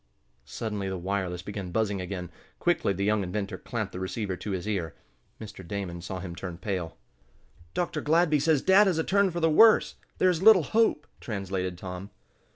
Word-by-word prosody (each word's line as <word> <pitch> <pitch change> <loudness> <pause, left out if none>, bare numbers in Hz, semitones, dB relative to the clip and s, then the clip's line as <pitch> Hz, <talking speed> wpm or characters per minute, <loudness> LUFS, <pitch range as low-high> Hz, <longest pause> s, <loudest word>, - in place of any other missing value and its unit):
Suddenly 105 0 -4
the 95 - -3
wireless 90 -1 -3
began 100 -2 -6
buzzing 100 0 -1
again. 90 -1 -5 0.3
Quickly 175 -11 +1
the 100 +1 -2
young 105 0 +2
inventor 100 +2 -4
clamped - - -4
the 90 - -5
receiver 95 +1 -3
to 105 - -7
his 95 0 -3
ear. 90 -7 -2 0.4
Mr. 105 -3 -9
Damon 90 -3 -4
saw 90 +1 -5
him 90 -2 -7
turn 90 -2 -6
pale. 90 -3 -4 0.8
"Dr. 165 -3 -1
Gladby 155 0 +3
says 155 -2 +2
dad 195 +2 +6
has 180 -4 +1
a 160 - +1
turn 200 +2 +3
for 175 -1 -4
the 165 - +4
worse. 215 +8 +5 0.2
There 185 - +4
is 170 -1 -2
little 205 -4 +7
hope," 220 -4 +2
translated 95 -4 -3
Tom. 90 +1 -7
100 Hz, 180 wpm, -27 LUFS, -, 0.8 s, little